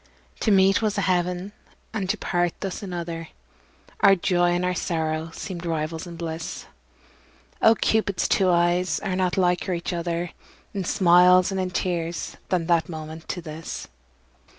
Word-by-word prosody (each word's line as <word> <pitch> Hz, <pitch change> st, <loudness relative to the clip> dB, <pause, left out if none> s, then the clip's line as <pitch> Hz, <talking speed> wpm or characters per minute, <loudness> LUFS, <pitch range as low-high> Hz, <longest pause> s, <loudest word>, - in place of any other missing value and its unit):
To -, -, 0 dB
meet 195 Hz, 0 st, +5 dB
was 210 Hz, -2 st, 0 dB
a -, -, +2 dB
heaven 180 Hz, +1 st, 0 dB, 0.4 s
and 200 Hz, -4 st, -2 dB
to -, -, +1 dB
part 175 Hz, -1 st, 0 dB
thus 195 Hz, +2 st, -4 dB
another, 170 Hz, -3 st, -5 dB, 0.7 s
Our 195 Hz, 0 st, +7 dB
joy 175 Hz, -1 st, +2 dB
and 180 Hz, +1 st, 0 dB
our 180 Hz, -, +1 dB
sorrow 160 Hz, -2 st, -2 dB
seemed 175 Hz, 0 st, -6 dB
rivals 160 Hz, 0 st, -3 dB
in 170 Hz, -, -8 dB
bliss; 165 Hz, -1 st, -5 dB, 1.0 s
Oh! 225 Hz, 0 st, +6 dB
Cupid's 215 Hz, -3 st, +1 dB
two 190 Hz, -1 st, +3 dB
eyes 175 Hz, +1 st, +2 dB
are 190 Hz, -3 st, -2 dB
not 185 Hz, 0 st, 0 dB
liker 180 Hz, 0 st, +1 dB
each 170 Hz, +1 st, -3 dB
other 170 Hz, 0 st, -2 dB, 0.4 s
In 195 Hz, -3 st, -3 dB
smiles 180 Hz, +1 st, +5 dB
and 190 Hz, -1 st, -1 dB
in 185 Hz, -, -1 dB
tears 175 Hz, -2 st, -2 dB
than 180 Hz, -3 st, +1 dB
that 170 Hz, -1 st, +2 dB
moment 160 Hz, 0 st, -8 dB
to 175 Hz, -, -4 dB
this. 160 Hz, 0 st, -7 dB
175 Hz, 155 wpm, -24 LUFS, 170-185 Hz, 1.0 s, Our